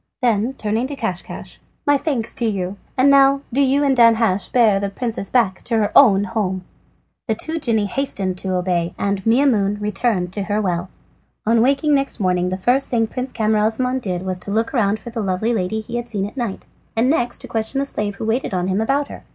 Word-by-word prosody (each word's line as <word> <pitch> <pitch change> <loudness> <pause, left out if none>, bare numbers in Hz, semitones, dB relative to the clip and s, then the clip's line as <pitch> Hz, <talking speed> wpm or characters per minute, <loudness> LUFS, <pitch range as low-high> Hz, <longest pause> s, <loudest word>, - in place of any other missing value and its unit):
Then 230 +1 +2
turning 220 +4 -1
to 285 - -5
Caschcasch: 190 -9 -5 0.3
"My 290 - +4
thanks 270 -6 -2
to 235 - 0
you, 195 -3 -2 0.2
and 260 +2 +4
now 275 0 +5
do 275 - +2
you 275 +1 +3
and 275 -2 +3
Danhasch 230 -5 +3
bear 220 -5 +4
the 200 0 -2
princess 220 -1 -4
back 225 -7 +1
to 230 - 0
her 210 -2 +1
own 205 -8 +7
home." 200 -4 -2 0.6
The 220 - +1
two 320 +8 -3
genii 225 -7 +1
hastened 200 -5 -2
to 190 -1 -2
obey, 175 -2 -1
and 200 -1 -1
Maimoune 225 -5 +3
returned 210 -3 -1
to 200 - -2
her 205 +1 0
well. 180 -3 -2 0.6
On 225 +1 +3
waking 280 +4 +2
next 275 -3 0
morning 180 -2 +1
the 185 - -2
first 250 +8 +2
thing 230 -2 +2
Prince 250 +3 -5
Camaralzaman 220 +4 +1
did 185 -5 -3
was 185 -1 -3
to 180 - -6
look 225 +5 0
round 215 -5 +2
for 235 - -10
the 230 -1 -3
lovely 195 +4 0
lady 220 +1 -1
he 235 +2 -5
had 240 0 -5
seen 200 -4 -2
at 205 - -8
night, 235 -7 -4 0.3
and 225 +2 +2
the 275 +5 +3
next 240 - -2
to - - -8
question 225 +4 -2
the 275 - +1
slave 210 -6 -3
who 220 - -5
waited 225 -2 -1
on 180 +1 -1
him 190 +3 0
about 275 +5 0
her. - - -10
220 Hz, 215 wpm, -20 LUFS, 195-250 Hz, 0.6 s, own